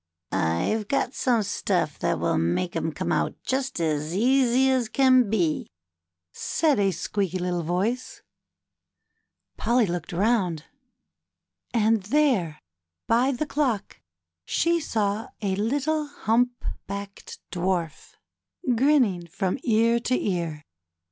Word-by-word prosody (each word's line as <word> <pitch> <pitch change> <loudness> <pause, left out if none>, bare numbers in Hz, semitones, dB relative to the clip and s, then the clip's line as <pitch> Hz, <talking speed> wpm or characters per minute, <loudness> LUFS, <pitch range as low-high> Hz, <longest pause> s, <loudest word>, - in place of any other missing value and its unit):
'' - - -48
I've 140 - 0
got 275 0 0
some 240 -4 +1
stuff 200 - -1
that - - 0
will - - +1
make 90 - -1
'em 160 0 -1
come - - -3
out - - 0
just 265 -5 -2
as 155 0 -1
easy 255 +3 +3
as 250 -4 +1
can 255 -3 +4
be," 175 -8 0 0.6
said 300 - +1
a 200 - +3
little - - +2
squeaky 190 +1 -2
voice. 180 +7 -2 1.3
Polly 235 +1 +2
looked 175 -3 -4
round, 180 -4 +1 1.1
and 225 -2 +2
there, 210 - +1 0.5
by 245 +4 +3
the 275 +3 -2
clock, 270 -9 -2 0.4
she 335 - +1
saw 215 -6 -1
a 195 -3 -1
little 290 +8 0
humpbacked 225 -6 -3
Dwarf 175 -3 -2 0.6
grinning 235 - +2
from 190 - -2
ear 230 0 +3
to 255 +2 0
ear. 170 -6 -2
215 Hz, 115 wpm, -25 LUFS, 180-255 Hz, 1.3 s, can